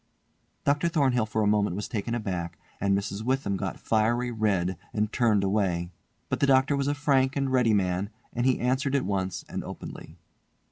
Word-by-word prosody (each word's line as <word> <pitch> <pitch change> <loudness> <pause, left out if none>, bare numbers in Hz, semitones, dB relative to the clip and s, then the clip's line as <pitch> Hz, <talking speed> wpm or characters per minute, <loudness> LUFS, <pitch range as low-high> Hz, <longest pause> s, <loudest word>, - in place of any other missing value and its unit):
Dr. 145 +4 +2
Thornhill 130 -8 +2
for 110 0 0
a - - +2
moment 105 -3 +2
was 105 0 -3
taken 115 +1 -2
aback, 90 -7 -3 0.2
and 100 0 +2
Mrs. 100 +1 -4
Witham 125 -4 0
got 95 -2 -4
fiery 120 +3 +1
red 100 -5 0 0.2
and 105 0 0
turned 110 -5 +3
away; 95 -4 0 0.4
but - - -2
the 140 - +3
doctor 135 +1 +4
was 140 0 0
a 145 - +1
frank 135 -2 +2
and 135 -2 0
ready 125 -4 +3
man, 95 0 0 0.2
and 120 +2 +1
he 130 - +2
answered 130 +3 +1
at 140 - +1
once 95 -2 -2
and - - -4
openly. - - -9
110 Hz, 185 wpm, -27 LUFS, 100-130 Hz, 0.4 s, doctor